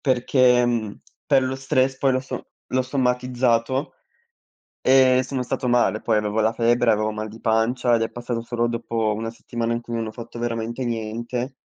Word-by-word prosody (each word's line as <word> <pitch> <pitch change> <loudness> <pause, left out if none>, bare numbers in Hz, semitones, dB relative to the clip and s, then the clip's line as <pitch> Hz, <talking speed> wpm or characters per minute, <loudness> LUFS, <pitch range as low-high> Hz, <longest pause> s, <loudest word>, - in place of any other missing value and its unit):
perché 125 -1 +3
mhmm, 110 -4 -2 0.3
per 135 -3 +4
lo 130 0 -1
stress, 130 0 +1
poi 135 -1 +2
l'ho 130 - +1
so 130 - -7 0.2
l'ho 130 0 +2
somatizzato 125 0 0 0.9
e 130 -1 +5
sono 130 0 -3
stato 125 +1 -2
male. 120 -3 +2
Poi 115 - +1
avevo 105 +1 -1
la 110 +1 +2
febbre, 120 0 +3
avevo 110 0 0
mal 110 0 -5
di 110 +2 -12
pancia 120 +2 +2
ed 115 - -1
è 115 - -1
passato 120 -1 -4
solo 120 0 -1
dopo 115 -2 -1
1 115 +1 -4
settimana 115 0 -4
in 120 - -2
cui 120 0 -6
non 115 -1 -2
ho 110 - -6
fatto 115 0 -9
veramente 115 +1 -3
niente. 120 +3 -3
120 Hz, 185 wpm, -23 LUFS, 115-130 Hz, 0.9 s, e